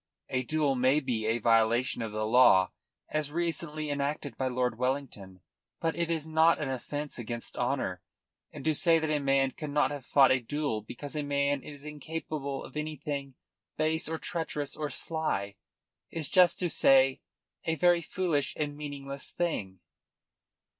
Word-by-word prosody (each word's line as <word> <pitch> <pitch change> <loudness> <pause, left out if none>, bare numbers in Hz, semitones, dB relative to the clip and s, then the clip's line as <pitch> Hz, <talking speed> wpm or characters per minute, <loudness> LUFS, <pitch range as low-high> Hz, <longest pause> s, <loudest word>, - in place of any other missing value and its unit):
A 130 - 0
duel 150 +2 +1
may 130 +3 +3
be 115 -6 -2
a 115 +1 +2
violation 115 +2 +2
of 110 -2 -3
the 110 0 -2
law 110 -5 +6 0.4
as 155 -1 -1
recently 155 -2 -2
enacted 145 0 -2
by 130 - -1
Lord 125 -2 -1
Wellington, 125 -8 -3 0.4
but 165 0 -1
it 170 -1 -1
is 160 -2 -1
not 160 +1 +4
an 145 -3 -2
offence 145 +2 -5
against 120 0 -6
honour; - - -1 0.5
and - - -9
to 160 - +3
say 165 +2 +5
that 160 -1 -1
a 150 - +2
man 135 -1 +2
cannot 150 0 0
have 145 -2 -5
fought 135 +1 +5
a 130 - +4
duel 135 -2 -2
because 135 +7 -8
a 150 - 0
man 140 -1 0
is 145 +1 -10
incapable 150 -2 -5
of - - -12
anything 145 -3 -4 0.4
base 155 +1 0
or 160 - -2
treacherous 150 -4 -3
or 150 -1 -3
sly 155 -14 -2 0.6
is 160 -4 -2
just 180 -2 +5
to 180 - 0
say 135 -1 +4 0.4
a 165 - +1
very 175 +1 +4
foolish 165 -3 -1
and 145 -1 -2
meaningless 140 -2 -5
thing." 95 - -3
145 Hz, 160 wpm, -29 LUFS, 130-155 Hz, 0.6 s, law